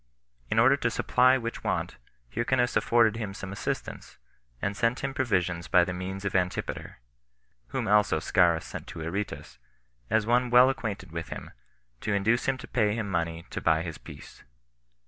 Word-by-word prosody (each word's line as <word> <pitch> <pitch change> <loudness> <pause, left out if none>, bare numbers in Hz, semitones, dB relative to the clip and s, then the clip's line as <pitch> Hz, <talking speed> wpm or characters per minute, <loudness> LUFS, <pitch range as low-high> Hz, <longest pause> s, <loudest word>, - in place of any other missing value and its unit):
In - - -1
order - - +6
to - - 0
supply 130 +1 +3
which 115 -2 -5
want, - - -2 0.4
Hyrcanus 120 +2 +1
afforded 115 -2 +3
him 105 -4 -4
some 95 -1 -7
assistance, 100 - -5 0.4
and 100 +7 -2
sent 115 +3 0
him 135 0 -2
provisions 90 -10 0
by 90 -2 +5
the 90 - -3
means 95 +2 -5
of 100 - -2
Antipater; 90 -1 -2 0.7
whom - - -3
also 105 -4 +4
Scaurus 85 -1 +2
sent - - -8
to 80 - -8
Aretas, 85 -7 -5 0.5
as 110 -1 +2
one 125 +2 +2
well 125 +2 +7
acquainted 105 -9 -5
with 80 0 -5
him, - - -7 0.5
to 100 - -1
induce 110 +5 +2
him 135 -1 +1
to 125 - -10
pay 105 -3 +1
him 105 -3 -3
money 85 -1 -2
to - - -4
buy 80 0 +2
his 80 -3 -6
peace. - - -12
100 Hz, 170 wpm, -28 LUFS, 90-120 Hz, 0.7 s, well